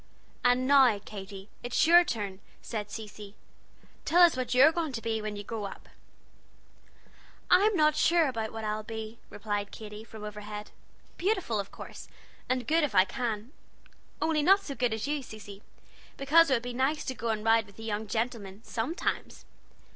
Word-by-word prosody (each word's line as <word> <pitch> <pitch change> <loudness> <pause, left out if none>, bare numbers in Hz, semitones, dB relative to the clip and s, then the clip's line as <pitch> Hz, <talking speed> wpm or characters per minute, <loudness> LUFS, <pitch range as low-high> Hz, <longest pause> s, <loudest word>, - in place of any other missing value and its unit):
"And 245 +1 +3
now, 265 -5 +6
Katy, 195 -1 -9
it's 245 +6 +1
your 345 +2 +8
turn," 205 - -4 0.2
said 210 -3 -5
Cecy; 210 -2 -9 0.7
"tell 350 +2 +5
us 345 - +6
what 255 -1 -2
you're 275 +5 +7
going 325 -4 -2
to 225 - -4
be 220 -1 -1
when 210 -1 -4
you 205 - -6
grow 215 0 -5
up." 200 - -9 1.6
"I'm 400 +4 +5
not 305 -2 +4
sure 335 -1 +4
about 225 -4 -3
what 225 0 -6
I'll 215 0 -2
be," 220 +1 -7
replied 205 -1 -3
Katy, 210 -1 -9
from 220 -1 -11
overhead; 210 0 -7 0.5
"beautiful, 365 - 0
of 200 - -4
course, - - -10 0.4
and 255 -1 0
good 325 +1 +3
if 265 -8 -1
I 185 - +7
can, 230 0 -4 0.7
only 315 -2 +1
not 390 +6 +5
so 280 - -5
good 245 -3 0
as 220 -1 -2
you, 295 0 -1
Cecy, 210 -4 -11 0.6
because 315 +4 +5
it 265 - +4
would 235 - -2
be 245 0 -5
nice 270 +5 0
to 260 - -2
go 235 -1 -4
and 220 -1 -2
ride 225 -1 +4
with 200 - -17
the 225 - -9
young 215 0 -3
gentlemen 220 -2 -3
sometimes. 245 - -3
225 Hz, 175 wpm, -29 LUFS, 210-275 Hz, 1.6 s, your